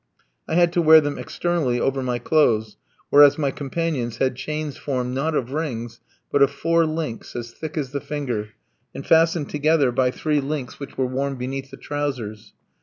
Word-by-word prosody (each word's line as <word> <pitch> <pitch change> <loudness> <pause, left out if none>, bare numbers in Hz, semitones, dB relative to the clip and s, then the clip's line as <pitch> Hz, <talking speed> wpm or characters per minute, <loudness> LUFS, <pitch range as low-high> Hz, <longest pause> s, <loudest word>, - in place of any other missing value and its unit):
I 160 - -1
had 175 0 +4
to 175 - +2
wear 160 -1 +8
them 145 -1 -3
externally 160 -9 -1
over 135 +1 0
my 125 -1 -1
clothes, 115 -5 +2 0.4
whereas 145 +1 +7
my 145 -3 0
companions 135 -5 -3
had 130 0 +1
chains 150 +2 -4
formed, 125 -3 -3
not 150 +4 -1
of 130 -3 -1
rings, 120 -7 -4 0.3
but 145 - +2
of 140 - +6
four 165 +3 +1
links, 155 -7 -4
as 120 -1 -5
thick 155 +5 -7
as 135 -4 -2
the 140 -1 -3
finger, 135 -8 -3 0.5
and 135 - -7
fastened 165 -2 +3
together 150 -2 +2
by 125 +1 +2
three 150 +3 0
links 140 -2 -4
which 140 - -9
were 130 - +1
worn 135 +2 -2
beneath 135 +1 -5
the 135 - -11
trousers. 130 -8 -4
140 Hz, 180 wpm, -23 LUFS, 125-155 Hz, 0.5 s, wear